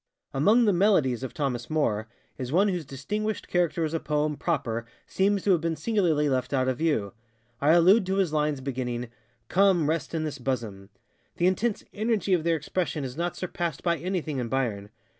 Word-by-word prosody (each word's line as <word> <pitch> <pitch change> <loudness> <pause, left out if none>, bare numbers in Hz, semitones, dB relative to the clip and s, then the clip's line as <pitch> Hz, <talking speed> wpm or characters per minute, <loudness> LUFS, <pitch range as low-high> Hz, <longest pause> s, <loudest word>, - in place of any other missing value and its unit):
Among 210 - +4
the 210 - +4
ŌĆ£MelodiesŌĆØ 175 - +3
of 130 - -7
Thomas 125 -5 -2
Moore 110 -9 0 0.3
is 125 -1 -5
one 195 +6 +4
whose 175 -4 -2
distinguished 210 +11 -3
character 175 -1 +1
as 155 - -4
a 165 - 0
poem 150 0 0
proper 125 -9 -2 0.2
seems 200 0 +1
to 200 - +3
have 175 -4 +3
been 165 0 -1
singularly 170 -8 +1
left 130 0 -1
out 130 -1 +1
of 130 -1 -1
view. 145 -11 0 0.5
I 150 +3 +5
allude 185 +4 +5
to 190 - 0
his 190 -5 +1
lines 150 -2 0
beginningŌĆöŌĆ£Come, 125 - -1
rest 160 +1 -1
in 160 - -1
this 145 -2 -4
bosom. 115 -7 -3
ŌĆØ 115 +4 -34
The 175 - +1
intense 205 +4 +1
energy 215 -2 0
of 170 -3 +2
their 170 0 +2
expression 160 0 -2
is 130 -1 -5
not 170 +2 -2
surpassed 170 -4 -4
by 170 -1 +1
anything 170 -6 -2
in 120 -2 -3
Byron. 115 -6 -2
155 Hz, 190 wpm, -27 LUFS, 130-180 Hz, 0.5 s, I